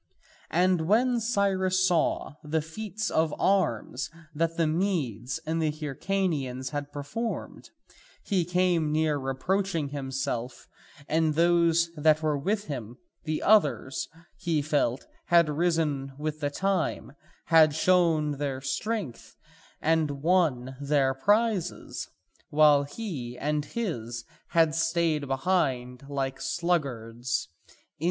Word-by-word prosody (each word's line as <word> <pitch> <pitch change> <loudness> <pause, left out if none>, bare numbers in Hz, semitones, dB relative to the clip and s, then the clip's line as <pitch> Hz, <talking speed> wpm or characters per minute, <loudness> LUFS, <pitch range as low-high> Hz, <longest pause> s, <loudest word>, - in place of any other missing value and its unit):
And 175 0 +2
when 240 +4 +3
Cyrus 195 -4 +1
saw 175 -5 +1
the 155 +1 -1
feats 215 +5 -4
of 160 -1 +1
arms 160 - +1 0.2
that 165 +2 -1
the 165 - +3
Medes 155 - -1
and 165 +1 -1
the 155 - +2
Hyrcanians 150 -4 -2
had 145 0 -4
performed, 215 +12 -5 0.5
he 190 -3 +1
came 175 -3 +1
near 155 -1 +1
reproaching 160 +4 -1
himself 135 -3 -4 0.4
and 155 -1 +1
those 170 0 +3
that 155 +1 +3
were 155 -1 +2
with 205 +9 -1
him; 125 - -6 0.3
the 155 -1 -2
others, 200 -10 +3 0.3
he 165 -5 0
felt, 140 -4 0 0.2
had 170 -1 +5
risen 150 -4 0
with 155 +1 -3
the 145 -2 -1
time, 190 -2 -1 0.3
had 155 -2 +5
shown 160 -5 +2
their 140 -2 -2
strength 140 - -4 0.5
and 150 -3 +1
won 150 -8 +2
their 140 -2 +2
prizes, 205 - 0 0.4
while 145 -1 +5
he 140 - -6
and 150 0 -1
his 120 - -4 0.2
had 165 -2 +3
stayed 165 -2 +1
behind 135 -4 -1
like 135 -1 -3
sluggards. 125 - -1
155 Hz, 115 wpm, -27 LUFS, 140-180 Hz, 0.5 s, had